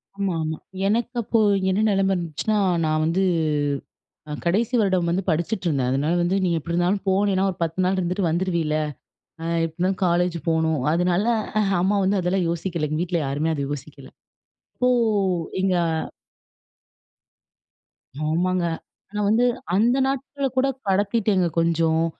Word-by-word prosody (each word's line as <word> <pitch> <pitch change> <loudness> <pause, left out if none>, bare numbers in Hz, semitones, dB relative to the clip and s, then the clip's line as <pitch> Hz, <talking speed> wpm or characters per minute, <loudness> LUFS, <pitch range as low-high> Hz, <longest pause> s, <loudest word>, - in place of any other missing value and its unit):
ஆமா, 195 -2 -1
ஆமா. 155 0 -3 0.3
எனக்கு 235 +4 0
அப்போ 225 +1 +1 0.3
என்ன 190 +3 +1
நிலைம 195 -1 +2
இருந்துச்சுன்னா, 175 +5 -1 0.3
நான் 155 0 +1
வந்து 170 +4 +1 1.1
அ - - -5
கடைசி 215 +8 +1
வருடம் 185 -5 +1
வந்து 180 +3 0
படிச்சிட்டுருந்தேன். 165 - 0
அதனால 145 +5 +1
வந்து 175 +2 +1
நீங்க 170 -2 +1
எப்பிடி 170 +2 -5
இருந்தாலும் 180 +3 +1
போனேனா, 190 0 +2
ஒரு 180 - -12
10 165 +2 -3
நாள் 190 +1 +1
இருந்துட்டு 180 +1 0
வந்துருவீல. 170 -2 0 0.7
அ - - -5 0.2
எப்பிடி 160 -1 -8
இருந்தாலும் 185 +1 0
காலேஜ் 175 0 +1
போணும், 160 -1 +1
அதுனால 180 +3 +1 0.3
அ - - +4 0.2
அம்மா 200 +3 +2
வந்து 195 +1 +2
அதெல்லாம் 180 +1 0
யோசிக்கல. 170 -2 -2
எங்க 155 +1 -2
வீட்ல 175 -1 -1
யாருமே 145 +4 -1
அத 145 - -3
யோசிக்கல. 140 -1 -8 0.7
இப்போ 250 - +2 0.7
எங்க 190 -1 +2 2.5
ஆமாங்க. 175 +3 +1 0.5
நான் 210 -1 0
வந்து 230 +3 +3 0.3
அந்த 235 +6 +3
நாட்கள 275 +1 -3
கூட 260 +1 +3 0.2
கடத்திட்டேங்க 200 -1 +2
கொஞ்சம். 165 -1 +2
180 Hz, 140 wpm, -23 LUFS, 165-195 Hz, 2.5 s, அ